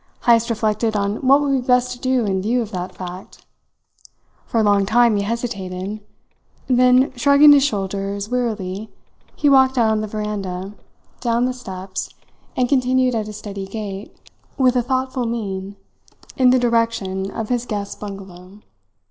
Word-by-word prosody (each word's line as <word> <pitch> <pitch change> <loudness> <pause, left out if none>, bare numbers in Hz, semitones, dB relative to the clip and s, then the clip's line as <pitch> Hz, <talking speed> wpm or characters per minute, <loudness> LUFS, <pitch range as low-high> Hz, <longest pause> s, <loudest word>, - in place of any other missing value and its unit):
Heyst 235 -1 +4
reflected 220 0 0
on 200 +1 0
what 275 +2 +4
would 285 -1 0
be 270 -2 +1
best 250 0 +2
to 245 - -7
do 255 -2 +1
in 190 -2 0
view 235 +4 0
of 220 - -10
that 180 -2 -5
fact. 180 +1 -9 1.0
For 230 - 0
a - - +3
long 205 -1 +3
time 230 +2 +3
he 200 - 0
hesitated; 200 -3 -4 0.7
then, 255 +1 +4
shrugging 285 +3 +6
his 285 -2 +6
shoulders 200 -4 -2
wearily, 215 -4 -3 0.5
he 295 - +1
walked 265 -1 +5
out 225 -2 +3
on 215 0 0
the 215 - -3
veranda, 200 -3 -4 0.5
down 235 0 +1
the 255 - -1
steps, 190 -6 -6 0.5
and 250 - +2
continued 255 -1 +2
at 220 -2 -2
a 215 - -7
steady 200 -2 -7
gait, 200 -1 -6 0.5
with 255 -2 +3
a 250 - +3
thoughtful 260 0 -2
mien, 200 -4 -4 0.6
in 255 -1 +4
the 255 - +5
direction 230 -5 0
of 220 0 -5
his 245 -1 -1
guests' 205 -2 -4
bungalow. 195 -2 -10
220 Hz, 160 wpm, -20 LUFS, 200-250 Hz, 1.0 s, shrugging